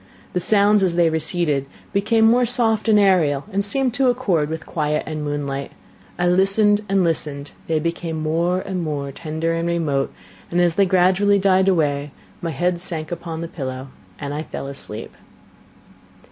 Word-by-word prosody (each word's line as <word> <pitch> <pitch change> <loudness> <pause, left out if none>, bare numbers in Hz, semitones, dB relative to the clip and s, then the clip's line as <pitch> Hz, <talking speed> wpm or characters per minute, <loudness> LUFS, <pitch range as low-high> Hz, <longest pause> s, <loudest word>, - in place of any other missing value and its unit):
The 180 - +1
sounds, 205 +2 +4
as 180 -3 +1
they 170 -2 +3
receded, 160 -3 0 0.3
became 220 +3 +3
more 240 +3 +5
soft 230 -2 +1
and 215 - +6
aerial, 165 -8 +3
and 200 +1 +1
seemed 255 +4 0
to 260 0 +3
accord 195 -12 +1
with 160 0 -5
quiet 150 -1 -1
and 155 -1 -4
moonlight. 140 -2 -3 0.4
I 180 - 0
listened 195 +3 +3
and 195 -1 +3
listened 150 -4 -2 0.2
they 160 - +1
became 165 0 -3
more 170 +4 0
and 190 -2 -4
more 145 -4 -3
tender 160 +3 -3
and 165 0 -1
remote, 155 -5 0 0.4
and, 175 - 0
as 175 -1 +3
they 195 +2 +3
gradually 190 +3 +3
died 190 -1 +3
away, 150 -6 +1 0.3
my 170 - -2
head 175 +3 -1
sank 165 -4 -5
upon 170 -1 -5
the 170 - -4
pillow 130 -4 -6 0.3
and 145 -1 -5
I 150 - -3
fell 155 - -6
asleep. 135 -5 -7
170 Hz, 170 wpm, -21 LUFS, 150-195 Hz, 0.4 s, and